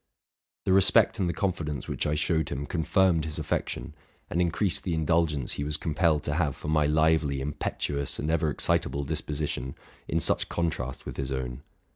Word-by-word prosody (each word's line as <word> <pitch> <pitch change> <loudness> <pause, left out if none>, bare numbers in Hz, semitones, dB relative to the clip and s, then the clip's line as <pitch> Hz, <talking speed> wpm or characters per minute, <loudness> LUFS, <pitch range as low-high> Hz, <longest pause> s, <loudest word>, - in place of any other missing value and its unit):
'The 95 - +3
respect 95 +3 +5
and 90 -3 +1
the - - +2
confidence 80 -6 -2
which - - -1
I 75 - +1
showed 80 0 0
him 70 +1 -3
confirmed 85 +2 +2
his 80 0 -4
affec 80 -1 -1
tion, 80 - -6 0.4
and 85 - +1
increased 90 +2 0
the 85 -3 -1
indulgence 80 -4 +1
he 70 - -3
was 75 +1 +1
compelled 80 0 +1
to 75 - -1
have 75 -3 0
for 75 - -6
my 75 -1 +3
lively, 75 -2 +2
impetuous, 70 0 -2
and 75 - -1
ever 80 -1 +2
excitable 70 0 +1
disposition, 70 -3 -3 0.3
in 80 - +1
such - - +1
contrast 80 -7 -2
with - - -7
his 70 -1 -3
own. 65 -1 -3
75 Hz, 180 wpm, -28 LUFS, 70-85 Hz, 0.4 s, respect